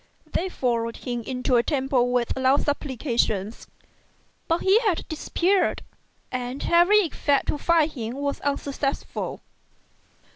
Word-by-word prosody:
They 375 +3 0
followed 230 -7 -1
him 240 -2 -4
into 250 +1 0
a - - +5
temple 260 -2 +1
with 245 -1 0
loud 265 +2 +3
supplications, 240 -7 -1 0.8
but 330 0 +1
he 390 +3 +5
had 415 -8 -1
disappeared, 355 +4 0 0.5
and 250 +2 -4
every 355 +5 +6
effort 290 -4 0
to 295 - -2
find 325 -1 +3
him 235 -4 -5
was 280 0 -3
unsuccessful. 280 0 -3
275 Hz, 120 wpm, -24 LUFS, 245-325 Hz, 0.8 s, every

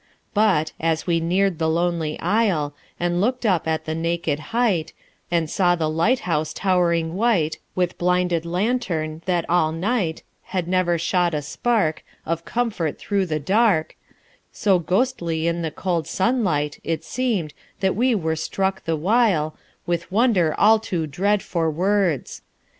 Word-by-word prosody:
But, 195 -8 +2
as 160 -1 0
we 170 -2 +2
neared 180 +1 +1
the 160 -1 +1
lonely 170 -2 -1
Isle; 180 -7 +1 0.3
And 175 0 0
looked 250 +3 0
up 185 -6 +2
at 160 0 -1
the 155 - -2
naked 165 -2 -1
height; 220 -9 +1 0.4
And 170 -2 +1
saw 175 +2 +2
the 160 -2 -1
lighthouse 165 -3 0
towering 170 -4 +1
white, 190 -7 +1 0.2
With 180 -1 -1
blinded 180 -1 +1
lantern, 170 -4 -1
that 175 -2 0
all 165 -2 +2
night 175 0 -1 0.2
Had 185 -2 -3
never 180 -1 +2
shot 170 0 +1
a 150 - -2
spark 165 - 0 0.2
Of 165 +1 -2
comfort 220 -10 -1
through 200 -2 -1
the 155 -2 -1
dark, 190 0 +2 0.6
So 195 -4 +2
ghostly 175 -4 0
in 170 0 0
the 165 - -1
cold 170 0 -2
sunlight 185 - 0
It 165 -1 -2
seemed, 220 - -2 0.3
that 190 -1 +1
we 245 +3 +2
were 160 -5 -1
struck 190 +4 -2
the 165 - 0
while 180 -3 +2 0.3
With 170 0 -2
wonder 195 -7 +3
all 220 +2 +5
too 180 -7 -2
dread 195 +7 0
for 165 -2 -1
words. 180 -2 0
175 Hz, 150 wpm, -22 LUFS, 160-200 Hz, 0.6 s, all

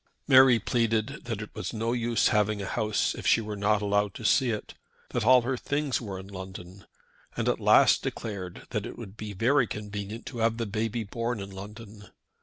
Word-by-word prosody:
Mary 130 -3 +7
pleaded 115 +3 -1
that 110 -3 -3
it 105 - -11
was - - -5
no 115 +1 -1
use 120 -2 +2
having 105 -2 +1
a 100 - -4
house 105 +2 0
if - - -5
she - - +5
were 105 -2 -5
not 105 +1 +1
allowed 100 -1 +1
to 115 - -7
see 130 +3 +4
it, 105 -2 -4 0.4
that 120 - -1
all 125 +1 +6
her 130 +2 -1
things 145 +1 -1
were 100 -5 -5
in 95 +1 -9
London, 95 -1 -9 0.5
and - - -1
at - - +1
last - - +5
declared 95 -5 -5
that - - -2
it - - -9
would 95 - -9
be 105 -1 -6
very 120 +5 +3
convenient 105 +1 -6
to 120 - -7
have 115 0 +1
the 115 - -2
baby 110 +2 -2
born 115 +2 -3
in 100 0 -7
London. 105 +2 -10
110 Hz, 205 wpm, -28 LUFS, 100-120 Hz, 0.5 s, Mary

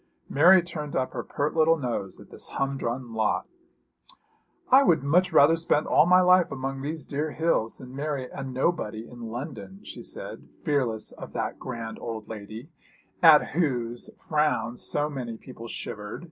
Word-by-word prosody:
Mary 175 +5 +6
turned 155 -4 -6
up 130 -1 -1
her 120 - -3
pert 145 +6 -2
little 165 +1 +4
nose 120 -8 -3
at - - -15
this - - -7
humdrum 130 -3 -2
lot. 110 -1 0 1.3
'I 265 +2 +8
would 170 - +3
much 180 +6 +3
rather 155 0 +6
spend 160 -2 +1
all 155 - +4
my 180 +1 +6
life 180 -1 +5
among 135 0 -4
these 155 +3 -4
dear 150 +2 -2
hills 160 -9 0
than 130 0 -11
marry 140 -2 -3
a 135 - -6
nobody 130 -4 -2
in 120 -1 -12
London,' 150 - -7
she - - -9
said, - - -6 0.2
fearless 130 - 0
of - - -10
that - - -3
grand 115 -3 -6
old 110 -2 -6
lady 110 +7 -8 0.5
at 160 -3 +7
whose 120 -8 -1
frown 150 -7 0
so 145 +4 -1
many 125 -6 -5
people 115 -1 -10
shivered. 105 -2 -5
135 Hz, 160 wpm, -26 LUFS, 120-160 Hz, 1.3 s, I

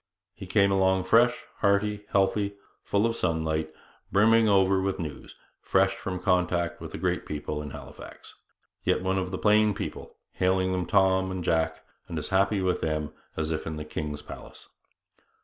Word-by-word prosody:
He 95 +1 -10
came 100 +1 +3
along 95 -1 +3
fresh, 120 +5 +3
hearty, 105 0 +1
healthy, 100 +1 +1 0.3
full 100 +2 +1
of 115 0 0
sunlight, 80 -2 -1 0.4
brimming 110 +2 +5
over 95 -1 +4
with 95 0 -1
news, 80 -6 -7 0.3
fresh 95 0 +2
from 95 -1 -4
contact 90 -2 0
with - - -6
the - - -6
great - - -1
people 75 0 -4
in 75 - -6
Halifax, - - -11 0.5
yet 90 - +1
one 95 0 +1
of 90 -1 -3
the 95 - -4
plain 105 0 +3
people, - - -6
hailing 95 0 +1
them 90 -2 -1
Tom 95 -1 +3
and 95 -1 -4
Jack, 80 -1 0 0.2
and 85 - -5
as 75 - -4
happy 95 +1 +2
with 90 -1 0
them 75 -1 -2 0.2
as 80 0 -1
if 80 0 -3
in 80 - -3
the 75 0 -6
king's 75 -1 -5
palace. - - -11
95 Hz, 170 wpm, -27 LUFS, 80-100 Hz, 0.5 s, brimming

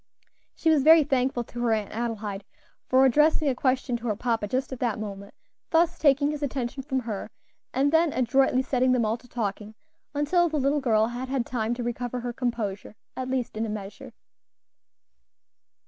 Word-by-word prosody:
She 325 - +2
was 305 -3 +4
very 320 +2 +7
thankful 260 -3 0
to 240 - -9
her 235 -2 +2
Aunt 215 -2 -2
Adelaide 215 -3 -4 0.4
for 260 +1 +5
addressing 300 +4 +3
a - - +2
question 255 0 0
to 235 +1 -6
her 215 - 0
papa 225 -1 -1
just 260 +5 -2
at 255 - -7
that 235 -4 0
moment, 200 -2 -7 0.3
thus 340 +1 +2
taking 285 -1 +3
his 300 -1 -5
attention 270 -2 -3
from 265 -1 -2
her, 220 -4 -5 0.4
and 280 +2 +1
then 325 0 +3
adroitly 260 +1 +2
setting 255 -1 +2
them 240 -3 +2
all 220 +2 0
to 245 - -19
talking 215 -2 -4 0.4
until 340 +4 +2
the 310 - -2
little 280 +1 +1
girl 220 -4 +3
had 250 +2 -5
had 265 -3 -1
time 235 -1 -2
to 245 - -4
recover 245 +1 -3
her 240 0 -4
composure, 230 -5 -3 0.2
at 255 0 -4
least 255 -4 -2
in 220 - -2
a 225 - -3
measure. 205 -1 -7
250 Hz, 185 wpm, -26 LUFS, 225-275 Hz, 0.4 s, very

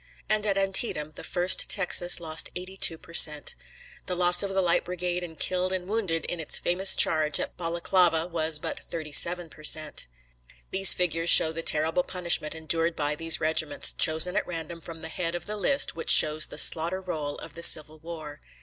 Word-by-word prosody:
and 215 0 -1
at 200 -1 -1
Antietam 195 -6 -2
the - - -9
1st 180 +1 +2
Texas 180 -2 +1
lost 160 -1 -3
82 185 -2 -1
percent. 155 -3 +1 0.5
The 180 - -3
loss 175 0 +3
of 200 - -1
the 195 0 -3
Light 175 -1 0
Brigade 180 0 -5
in 165 -2 -10
killed 185 +2 -2
and 185 -1 -5
wounded 195 -7 -4
in 175 - -4
its 160 - -2
famous 190 +2 +1
charge 155 -2 +2
at - - -6
Balaklava 170 -1 0
was 160 -3 -3
but - - -6
37 170 +2 -1
per 155 - -18
cent. 155 - -2 0.6
These 190 0 +7
figures 170 -1 -2
show 160 - +8
the 165 +1 -6
terrible 160 +2 +1
punishment 175 -4 -3
endured 165 +1 -3
by 145 0 -3
these 165 +1 0
regiments, 155 -2 -1
chosen 160 +4 +2
at - - -3
random 165 -1 -8
from 165 0 -11
the - - -8
head 170 -1 -5
of 175 - -6
the 210 - -5
list 275 +7 +1
which 165 - -7
shows 155 0 +5
the - - -10
slaughter 170 +4 +3
roll 155 -6 -6
of - - -11
the 170 - -10
Civil 155 -1 +3
War. 155 -2 -11
170 Hz, 185 wpm, -25 LUFS, 160-180 Hz, 0.6 s, show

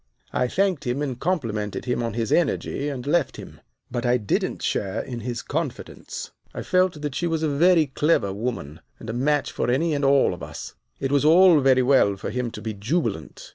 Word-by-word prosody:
"I 125 - +1
thanked 180 -3 0
him, 130 +4 -1
and 130 -4 -4
complimented 115 - -2
him 125 -1 -1
on 115 -2 -3
his 115 -2 -2
energy, 145 -3 0
and 130 -3 -5
left 150 -1 +1
him. - - -11 0.3
But 120 -1 -2
I 125 0 +3
didn't 105 -5 -2
share 100 +2 -1
in 120 -2 -5
his 120 +1 -4
confidence. - - -5 0.2
I - - -4
felt 185 -5 +1
that 145 -2 -2
she 175 - -1
was 160 -1 -1
a - - +2
very 165 +3 +4
clever 135 -7 +1
woman, 100 - -4 0.2
and 115 - -6
a - - -6
match 145 +3 +1
for - - -2
any 155 +6 +1
and 145 -1 -1
all 135 -7 +4
of 90 - -9
us. - - -8 0.3
It 135 - -2
was 140 -1 +3
all 170 +1 +7
very 130 -2 +4
well 125 -6 +4
for 95 - -5
him 125 -1 -2
to - - -9
be 110 -1 -3
jubilant. 105 - -3
130 Hz, 210 wpm, -24 LUFS, 115-150 Hz, 0.3 s, all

